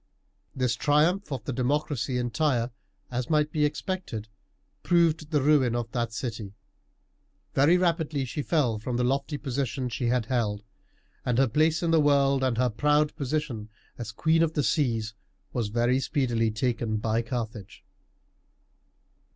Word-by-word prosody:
This 125 -3 +1
triumph 155 +5 +2
of 130 -5 -3
the 135 - -3
democracy 130 0 -1
in 120 -1 -2
Tyre, 125 -5 +1 0.4
as 125 0 -3
might 150 -1 +2
be 150 -1 +2
expected, 150 - -4 0.5
proved 165 -3 +2
the 150 -4 +1
ruin 135 -5 +4
of 120 -2 -3
that 120 -2 -1
city. 110 -4 -5 1.0
Very 150 +6 +5
rapidly 160 -6 0
she 130 +4 -4
fell 135 -8 +1
from 120 +2 -3
the 125 - +1
lofty 140 +4 0
position 135 -1 -2
she 120 +1 -2
had 120 -1 +1
held, 105 -4 -1 0.6
and 120 -2 0
her 135 0 +4
place 155 +7 +2
in 165 - +1
the 165 -1 +5
world 140 -2 +3
and 130 -3 +1
her 125 +1 +3
proud 150 +5 +2
position 135 -7 -3 0.3
as 115 -3 -6
Queen 160 +8 +2
of 165 -1 +2
the 150 - 0
Seas 115 -4 0 0.4
was 120 -4 -1
very 120 +4 +1
speedily 120 -5 0
taken 115 0 -1
by 110 +1 0
Carthage. 110 -4 -6
130 Hz, 150 wpm, -27 LUFS, 115-150 Hz, 1.0 s, Very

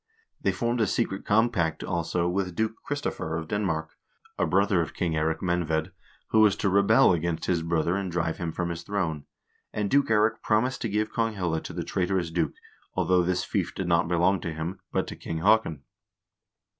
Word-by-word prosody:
They - - +2
formed 120 -2 -1
a 110 - +3
secret 95 -4 -1
compact, 105 -6 +2
also, 85 0 -1
with 90 0 -1
Duke 110 +2 0
Kristoffer 145 - -3
of 80 -1 -5
Denmark, 80 -6 -1 0.4
a - - 0
brother 100 -1 +3
of 80 - -5
King 85 -4 -1
Eirik 80 +1 0
Menved, 85 -3 0 0.4
who 110 - +3
was 105 -2 +6
to 100 - 0
rebel 100 -1 +5
against 85 0 -1
his 85 -2 +1
brother 85 +1 0
and 100 -2 -2
drive 85 -1 -1
him 85 -2 -2
from 85 +1 -2
his 85 0 -4
throne, 85 -6 -2 0.5
and 105 -1 -2
Duke 140 -1 +3
Eirik 110 +1 +2
promised 125 +4 +1
to 115 - -1
give 105 +2 -1
Konghelle 95 -8 -1
to - - -6
the - - -4
trait 90 -1 -1
orous 90 -4 -1
duke, 85 -2 0 0.4
although 90 -1 +3
this 90 +1 0
fief - - -2
did 95 - -3
not 85 -1 +3
belong 90 +2 +2
to 85 - -3
him, 80 +4 -4
but - - 0
to - - -7
King 80 - -5
Haakon. 105 -5 +3
90 Hz, 195 wpm, -27 LUFS, 85-105 Hz, 0.5 s, was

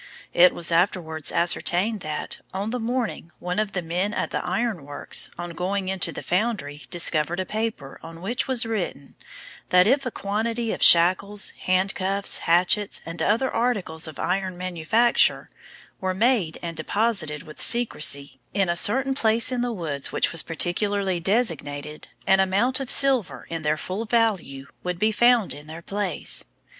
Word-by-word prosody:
It 180 +1 +6
was 170 0 -2
afterwards 165 -3 +1
ascertained 180 +5 +1
that, 155 -4 -5 0.2
on 200 +3 -3
the 250 - -2
morning 235 -6 -3
one 180 +2 -3
of 215 -2 -2
the 180 - -3
men 180 +6 -2
at - - -2
the - - -2
Iron 230 -10 -2
Works, 145 +1 0
on 175 0 -6
going 185 +3 -3
into 190 -1 -1
the - - -8
foundry, 180 -7 -2
discovered 170 0 0
a 185 - -1
paper, 215 -10 -4
on 165 +1 -11
which 235 +6 -1
was 255 -3 +1
written, 185 -11 -4 0.6
that 180 0 +5
if 270 +6 +2
a 250 - -2
quantity 225 +2 -2
of - - -7
shackles, 185 +4 +5
handcuffs, 190 +1 +1
hatchets, 180 +4 +1
and 165 0 -6
other 230 +9 +1
articles 195 -10 -1
of 155 - -9
iron 185 0 -2
manufacture, 185 +6 +1 0.5
were 185 -1 -2
made 210 -6 +1
and 170 -1 -5
deposited, 200 -8 -1
with 155 -3 -9
secrecy, 140 - +1 0.2
in 195 -3 +1
a 170 - +1
certain 265 +9 +3
place 230 -1 +3
in 250 -1 -1
the 245 0 -1
woods, 155 -9 -3
which - - +1
was 165 - +3
particularly 190 +2 -1
designated, 155 - -1 0.2
an 190 0 +4
amount 200 +8 +2
of 270 -2 -5
silver, 265 -8 +3
to 165 - -3
their 155 0 0
full 190 +8 -5
value, 210 - 0 0.2
would 180 -1 -3
be 215 +4 +2
found 240 -1 +3
in 145 +1 -11
their 160 +2 -9
place. 200 -1 -1
190 Hz, 165 wpm, -24 LUFS, 165-225 Hz, 0.6 s, It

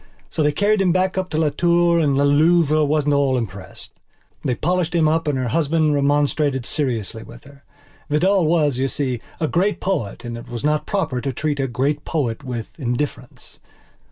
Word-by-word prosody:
So - - -2
they 150 0 +3
carried 205 +6 +2
him 185 -2 +3
back 185 +1 +1
to 185 -4 -3
Las 155 -2 +1
Tours 170 -1 +3
and 140 -2 +2
La 140 - +3
Louve 155 +2 +4 0.2
wasn't 150 -1 +1
at - - +3
all 135 -2 +2
impressed. 100 -5 -7 0.5
They 125 - 0
polished 175 +3 -1
him 160 -2 +3
up 160 +1 0
and 145 -2 0
her 130 -2 -1
husband 155 +2 +1
remonstrated 145 -2 +1
seriously 115 -7 -2
with - - -13
her. 140 0 -17 0.5
Vidal 175 +3 +2
was, 150 -6 +2
you 135 - +1
see, 130 -4 -2 0.2
a 155 - 0
great 190 +7 0
poet 150 - -3
and 120 0 -5
it - - -12
was 120 -2 -6
not 150 0 0
proper 165 -11 -1
to 135 - -2
treat 145 +2 -2
a 135 - 0
great 140 +4 -1
poet 135 -6 -2
with 120 -4 -5
indifference. 125 0 -5
145 Hz, 190 wpm, -21 LUFS, 130-165 Hz, 0.5 s, Louve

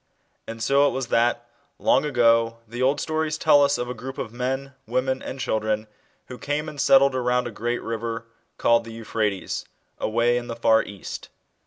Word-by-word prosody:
And 115 0 -5
so 140 +4 +4
it - - -1
was 130 -2 -3
that, 120 +1 +1 0.3
long - - +3
ago, 115 -4 +3
the 120 +3 -6
old 135 +3 +2
stories 155 -1 -1
tell 145 -2 +5
us 140 0 +2
of 120 - -3
a 125 - -3
group 130 +3 -8
of 110 - -5
men, 130 +3 -3
women, 130 +2 0
and* 135 - -6
children, 110 -3 -1 0.4
who 125 - -10
came 150 +2 -2
and 150 -2 -4
set 135 - +7
tied 140 -1 +3
around 125 -1 +1
a 120 - -4
great 120 +3 -3
river, 115 0 -4 0.3
called 115 0 +3
the 115 0 -9
Euphrates, 110 -3 -2 0.4
away 120 +2 +2
in 120 - -9
the 115 - -4
far 115 -1 +4
East. 100 -2 -8
120 Hz, 190 wpm, -24 LUFS, 115-135 Hz, 0.4 s, set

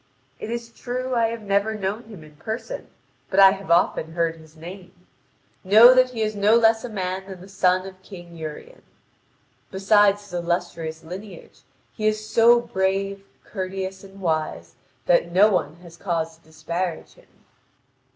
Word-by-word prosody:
It - - -6
is 235 0 -5
true 255 +2 -4
I 230 -2 +2
have 230 -1 -6
never 200 +2 0
known 205 +3 -4
him 210 -8 -12
in 155 -1 -16
person, 225 - -6 0.4
but 195 - +1
I 195 -1 +9
have 195 -1 -7
often 160 -1 +2
heard 165 -1 0
his 160 -1 -17
name. 180 +2 -10 0.7
Know 220 +6 +8
that 255 0 +4
he 230 -3 -3
is 215 0 -2
no 205 +2 +4
less 225 -1 +4
a 245 - -5
man 190 -2 -4
than 190 -2 -9
the 185 - -12
son 185 -1 +1
of 190 -1 -11
King 175 -3 -12
Urien. 160 - -9 0.9
Beside 200 +1 +4
his 205 -2 -16
illustrious 170 -2 -3
lineage, 185 +2 -10 0.3
he 215 - -1
is 215 0 -1
so 235 +2 +5
brave, 195 -1 -2 0.2
courteous, 190 -1 -5
and 195 0 -14
wise 155 - -2 0.3
that 170 0 +2
no 200 +5 +5
one 180 -4 -1
has 170 -1 -14
cause 165 -4 -3
to 165 - -29
disparage 165 +2 -5
him. - - -22
190 Hz, 165 wpm, -23 LUFS, 170-215 Hz, 0.9 s, I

